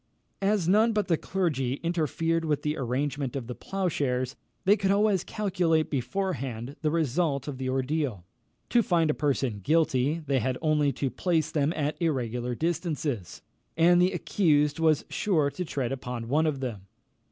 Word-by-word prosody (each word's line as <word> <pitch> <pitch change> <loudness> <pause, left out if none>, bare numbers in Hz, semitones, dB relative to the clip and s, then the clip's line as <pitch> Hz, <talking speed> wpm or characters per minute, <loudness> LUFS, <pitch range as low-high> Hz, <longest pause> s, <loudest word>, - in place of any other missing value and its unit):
As 195 -3 +1
none 215 +5 +4
but 210 -3 0
the 165 - +4
clergy 150 -9 -1
interfered 165 0 0
with 150 -2 -1
the 150 0 0
arrangement 135 +1 -2
of 135 -4 -3
the 125 - -5
ploughshares, 140 -9 -2 0.3
they 200 +2 +6
could 195 -2 -1
always 200 -2 +3
calculate 180 -6 0
beforehand 135 -3 -3
the 155 - +1
result 150 -2 0
of 135 -3 -5
the 130 -1 -2
ordeal. 130 - -1 0.5
To 240 - +5
find 170 -6 +2
a - - -1
person 135 -8 -1
guilty, 150 - +1
they 135 -2 +1
had 125 +2 -1
only 150 -2 +2
to 135 -3 -2
place 160 +4 0
them 150 0 +1
at 150 +2 -2
irregular 125 -6 -1
distances, 155 - -2 0.3
and 175 +2 +5
the 180 +1 +4
accused 155 -5 +2
was 160 -2 +3
sure 155 -8 +1
to 180 - -4
tread 135 -7 -3
upon 125 -3 -5
one 155 +4 +3
of 140 -3 -2
them. 105 -7 -5
150 Hz, 165 wpm, -27 LUFS, 130-170 Hz, 0.5 s, they